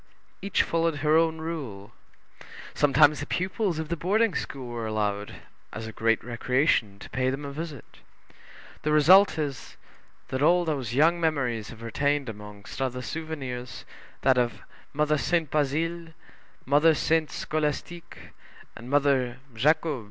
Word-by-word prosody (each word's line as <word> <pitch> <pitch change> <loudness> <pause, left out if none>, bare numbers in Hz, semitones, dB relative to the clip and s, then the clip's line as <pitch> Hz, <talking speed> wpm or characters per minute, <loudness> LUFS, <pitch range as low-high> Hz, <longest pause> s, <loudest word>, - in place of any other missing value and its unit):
Each 200 0 +1
followed 165 -1 0
her 155 +1 +4
own 160 0 +3
rule. 140 -12 -6 0.8
Sometimes 145 0 +4
the 145 - -5
pupils 185 -1 -1
of 160 -1 -4
the 170 - 0
boarding 200 +5 +1
school 135 -5 -5
were 120 -2 -4
allowed, 105 -1 -2 0.4
as 110 - -6
a 110 - -6
great 115 +1 +1
recreation, 120 -3 +1
to - - -11
pay 130 0 0
them 135 +2 -4
a 140 - -5
visit; 150 -3 -6 1.0
the 150 - -1
result 180 +6 +6
is, 145 -4 -4 0.5
that 130 +1 -2
all 175 +3 +4
those 135 -7 -2
young 165 +5 +4
memories 125 -9 -1
have 115 0 -11
retained 140 +3 0
among 105 -1 -10
other 130 -1 -2
souvenirs 135 -7 -6 0.4
that 130 -2 +4
of 120 -1 -1 0.3
Mother 150 0 +1
Sainte 165 -2 0
Bazile, 160 +3 -1 0.5
Mother 150 +4 +4
Sainte 160 +1 +1
Scolastique, 155 +3 -4 0.4
and 120 - -10
Mother 135 -3 +2 0.2
Jacob. 150 +4 +1
145 Hz, 140 wpm, -26 LUFS, 125-160 Hz, 1.0 s, result